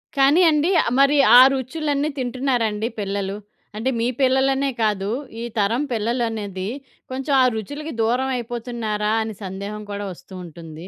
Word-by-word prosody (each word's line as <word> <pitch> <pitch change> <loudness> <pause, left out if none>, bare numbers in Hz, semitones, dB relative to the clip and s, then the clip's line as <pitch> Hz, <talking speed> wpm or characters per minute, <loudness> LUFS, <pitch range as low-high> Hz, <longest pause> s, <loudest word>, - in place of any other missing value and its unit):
కానీ 280 +6 +5
అండీ, 305 +3 +2
ఆహ్, - - -2
మరి 275 +2 +5 0.2
ఆ - - +11
రుచులన్నీ 290 +2 -1
తింటున్నారా 250 -1 0
అండి 210 +2 -2
పిల్లలు? 200 0 -3 0.4
అంటే, 230 +5 -1
మీ 235 - +1
పిల్లలనే 265 +1 +2
కాదు, 205 -2 0 0.3
ఈ - - -4
తరం 220 +6 +1
పిల్లలు 235 +2 0
అనేది 200 -3 -4 0.4
కొంచుం 270 +2 -2
ఆ - - +6
రుచులుకి 290 +8 -5
దూరవైపోతున్నారా 235 -3 -1
అని 220 -1 -5
సందేహం 200 +3 -6
కూడా 205 0 -4
ఒస్తూ 190 - -16
ఉంటుంది. 165 +1 -10
235 Hz, 145 wpm, -22 LUFS, 205-265 Hz, 0.4 s, ఆ